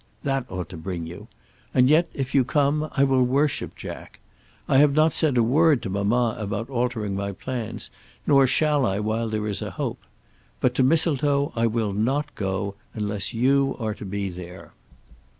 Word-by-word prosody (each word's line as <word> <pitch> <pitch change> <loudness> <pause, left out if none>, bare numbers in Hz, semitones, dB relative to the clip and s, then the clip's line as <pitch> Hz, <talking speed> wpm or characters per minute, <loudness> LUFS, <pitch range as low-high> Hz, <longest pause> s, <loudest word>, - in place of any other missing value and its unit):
That 135 -2 -1
ought 90 -3 -4
to 90 - -8
bring 85 0 -5
you. 90 +6 -9 0.5
And 125 0 +5
yet, 160 +4 +4
if 135 -2 -4
you 135 - +5
come, 145 +3 +1
I 135 - +5
will 135 -1 +3
worship 135 +4 +1
Jack. - - -9 0.5
I - - +3
have 145 -1 +5
not 155 +1 +4
said 145 -5 +2
a 120 - +5
word 145 +3 +3
to 95 - -4
mamma 110 +4 +1
about 105 +4 -4
altering 120 -5 -1
my 100 0 -3
plans, 120 +2 -5 0.3
nor 140 -2 +5
shall 150 +1 +2
I 95 -4 0
while 110 +2 -1
there 110 -1 -2
is 105 -2 -2
a - - -3
hope. - - -4 0.6
But 125 - +2
to 130 - +1
Mistletoe 145 -1 +2
I 115 0 +2
will 110 -3 -1
not 130 +8 0
go, 95 0 -2 0.2
unless 105 +1 -2
you 135 +3 +2
are 110 -2 -2
to 105 - -10
be 100 0 -3
there. 90 +1 -10
120 Hz, 185 wpm, -24 LUFS, 100-140 Hz, 0.6 s, And